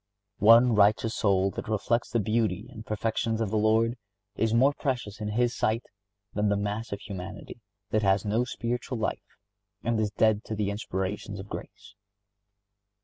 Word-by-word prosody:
One 115 +3 +7
righteous 105 +2 +3
soul 100 -2 +2
that - - -6
reflects 110 +3 0
the 120 - +1
beauty 110 0 0
and 110 -3 -9
perfections 110 +1 -1
of 110 -3 -1
the 110 - +1
Lord, 110 +3 +2 0.4
is 110 +1 +1
more 130 +5 +4
precious 120 -8 -3
in 105 - -2
His 120 +3 +1
sight 110 +2 0 0.5
than 105 0 +1
the 100 - +2
mass 105 +3 -3
of 100 - -3
humanity 95 +4 -8 0.3
that 110 - +2
has 95 0 +2
no 110 +4 +1
spiritual 125 +1 -3
life, 110 - -4 0.5
and 115 -1 0
is 110 -1 +1
dead 110 +1 +2
to 110 - -4
the 105 -1 -1
inspirations 100 0 -4
of 100 +2 -9
grace. 100 0 -9
110 Hz, 165 wpm, -28 LUFS, 100-115 Hz, 0.5 s, One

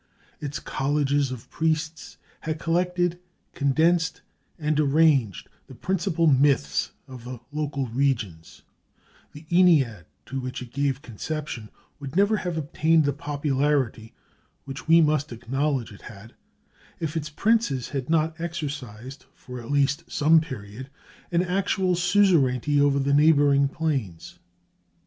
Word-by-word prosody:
Its 145 -1 -4
colleges 140 0 0
of 125 -3 -8
priests 160 0 -2 0.2
had 160 0 -3
collected, 175 +1 0 0.3
condensed, 165 +5 +1 0.3
and 155 -2 0
arranged 140 - +2 0.2
the - - -12
principal 180 -3 0
myths 135 - +2 0.2
of 130 -3 -10
the 125 0 -7
local 145 -2 -2
regions; 115 -10 -2 0.7
the 150 +2 -12
Ennead 150 - +4 0.2
to 135 - -4
which 130 0 -5
it 125 -2 -9
gave 140 0 -1
conception 125 -2 -5 0.3
would 140 0 -8
never 205 +3 +3
have 175 -4 -3
obtained 160 +1 +2
the 145 - +1
popularity 140 -5 -1 0.5
which 135 +2 -8
we 165 +1 +7
must 150 -2 +1
acknowledge 135 +2 -2
it 100 - -15
had, 110 +1 -12 0.7
if 160 -1 -3
its 155 -2 -3
princes 200 - +1
had 135 -1 -4
not 160 0 +1
exercised, 140 -7 -6
for 125 -1 -9
at 115 - -11
least 145 +2 0
some 160 +2 +5
period, 130 -3 -8 0.4
an 175 +1 +2
actual 185 0 0
suzerainty 170 - +3
over 140 -1 +3
the 140 0 +1
neighboring 145 -2 +5
plains. 135 - -3
145 Hz, 125 wpm, -25 LUFS, 130-160 Hz, 0.7 s, we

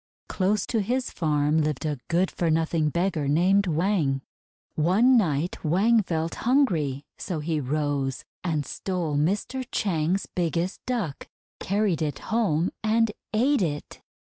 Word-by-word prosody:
Close 200 +2 0
to 225 - 0
his 245 +5 -1
farm 150 -1 +1
lived 150 -1 -2
a 150 -3 -2
good 180 +3 +1
for 170 - -1
nothing 160 -1 +1
beggar 170 -3 0
named 185 +7 +3
Wang. 160 -5 +1 0.5
One 200 +12 +4
night 170 - 0
Wang 205 +8 +3
felt 165 -3 -2
hungry, 170 - +1
so 175 -5 -3
he 155 0 -1
rose, 145 -1 -1 0.2
and 155 -5 -1
stole 175 -1 -3
Mr. 200 - 0
Chang's 180 -1 0
biggest 175 +1 -2
Duck, 215 - -3 0.3
carried 200 -4 0
it 150 -3 -1 0.2
home, 180 -7 +2
and 225 0 +2 0.2
ate 255 +4 +2
it. 150 -5 -3
170 Hz, 135 wpm, -26 LUFS, 150-205 Hz, 0.5 s, One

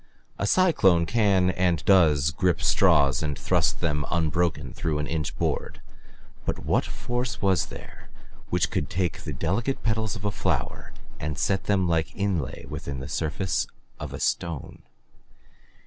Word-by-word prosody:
A 100 - 0
cyclone 95 - +4
can 95 -2 +3
and 90 -3 0
does 75 -7 +5
grip 90 +3 +1
straws 75 -9 +4
and 75 -2 -2
thrust - - +1
them 75 -3 0
unbroken 85 0 0
through 80 -3 -2
an 75 - -1
inch 75 -1 -3
board - - -2 0.6
but - - -3
what - - +2
force 120 0 -3
was 95 -5 +2
there - - -12 0.4
which - - +1
could 75 - -1
take 90 0 -1
the - - -5
delicate 100 - -1
petals 110 -1 0
of 105 -1 -7
a 105 - +1
flower - - -2 0.3
and 75 0 -3
set 95 -1 0
them 95 -3 +2
like 80 -2 0
inlay 95 -9 -2
within 70 -1 -5
the 65 - -6
surface 80 +6 -1 0.3
of - - -6
a - - -6
stone? 85 -5 -2
85 Hz, 150 wpm, -26 LUFS, 75-100 Hz, 0.6 s, does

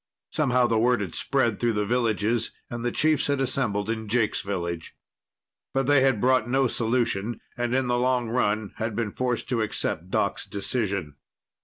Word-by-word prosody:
Somehow 125 -5 +2
the 115 -2 +2
word 120 +2 +3
had 90 -5 -4
spread 120 -6 0
through 120 -1 +1
the 105 -1 0
villages 115 -1 +1 0.2
and 120 0 -4
the 120 - 0
chiefs 155 +1 +2
had 140 -1 +1
assembled 115 -6 0
in 110 -1 -3
Jake's 115 0 +1
village. 85 -4 -4 0.8
But 135 -1 +2
they 145 0 +5
had 130 -5 +3
brought 125 0 +3
no 135 +1 +3
solution, 115 -2 0 0.2
and 120 0 -1
in 130 0 +2
the 120 0 +1
long 125 -1 +1
run 110 -3 0
had 110 -1 -2
been 115 -2 -1
forced 125 0 -2
to 120 -3 +1
accept 90 -4 -2
Doc's - - -1
decision. 100 - -2
120 Hz, 175 wpm, -26 LUFS, 105-125 Hz, 0.8 s, they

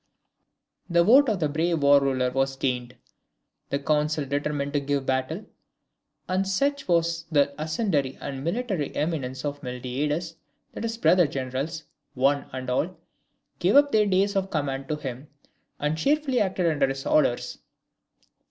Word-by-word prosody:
] - - -47
The 170 - +6
vote 265 +7 +6
of 210 -4 0
the 155 - +1
brave 160 +1 0
War 140 0 +7
Ruler 130 -2 +1
was 135 +1 0
gained; 125 -2 -2 0.7
the 140 - 0
council 150 +1 0
determined 145 +1 -2
to 145 - +2
give 140 -1 -1
battle; 130 +9 -1 0.8
and 190 +1 0
such 280 +9 0
was 170 -1 +1
the 140 -2 +3
ascendancy 155 - -1
and 135 -1 -6
military 190 - -2
eminence 140 -4 -2
of 145 0 -4
Miltiades, 145 +6 -3 0.4
that - - -6
his 225 0 -3
brother 180 -7 +4
generals, 135 +4 -4 0.3
one 140 +2 +2
and 130 0 -6
all, 160 +8 -1 0.6
gave 185 +8 +2
up 285 0 +6
their 215 -1 +3
days 200 +1 +2
of 195 0 0
command 135 -4 -2
to 155 - -1
him, 135 -1 -7 0.5
and 150 +2 -1
cheerfully 285 - +1
acted 190 -2 0
under 145 -4 +2
his 135 0 -4
orders. 125 -5 +1
150 Hz, 150 wpm, -26 LUFS, 135-180 Hz, 0.8 s, War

